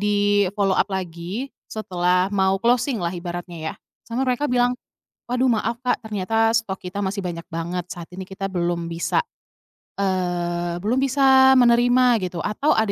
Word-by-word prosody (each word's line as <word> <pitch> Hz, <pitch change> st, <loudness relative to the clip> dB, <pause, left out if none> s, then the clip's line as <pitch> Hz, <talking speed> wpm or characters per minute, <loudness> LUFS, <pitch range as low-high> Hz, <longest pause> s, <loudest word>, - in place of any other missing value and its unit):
di-follow-up 205 Hz, -1 st, +2 dB
lagi- 185 Hz, +7 st, -4 dB, 0.2 s
setelah 180 Hz, -3 st, 0 dB
mau 190 Hz, 0 st, +2 dB
closing 240 Hz, +1 st, +2 dB
lah 170 Hz, 0 st, -1 dB
ibaratnya 175 Hz, 0 st, -6 dB
ya, -, -, -13 dB, 0.3 s
sama 250 Hz, +3 st, -2 dB
mereka 255 Hz, +3 st, 0 dB
bilang, 245 Hz, 0 st, +2 dB, 0.6 s
"Waduh 250 Hz, +1 st, +2 dB
maaf 230 Hz, +1 st, 0 dB
Kak, 250 Hz, -, +1 dB
ternyata 225 Hz, +2 st, +1 dB
stok 205 Hz, -4 st, -1 dB
kita 190 Hz, +2 st, -4 dB
masih 195 Hz, +1 st, -2 dB
banyak 170 Hz, -2 st, -5 dB
banget, 170 Hz, +2 st, -3 dB
saat 175 Hz, -2 st, -9 dB
ini 190 Hz, -, -5 dB
kita 195 Hz, +1 st, -5 dB
belum 170 Hz, -2 st, -1 dB
bisa, 170 Hz, 0 st, 0 dB, 0.8 s
eee, 175 Hz, -2 st, -1 dB
belum 240 Hz, +5 st, +1 dB
bisa 265 Hz, -1 st, +5 dB
menerima," 245 Hz, +1 st, +5 dB, 0.2 s
gitu, 175 Hz, -1 st, -8 dB
atau 245 Hz, +8 st, +1 dB
ada 220 Hz, -2 st, +2 dB
200 Hz, 150 wpm, -22 LUFS, 180-235 Hz, 0.8 s, bisa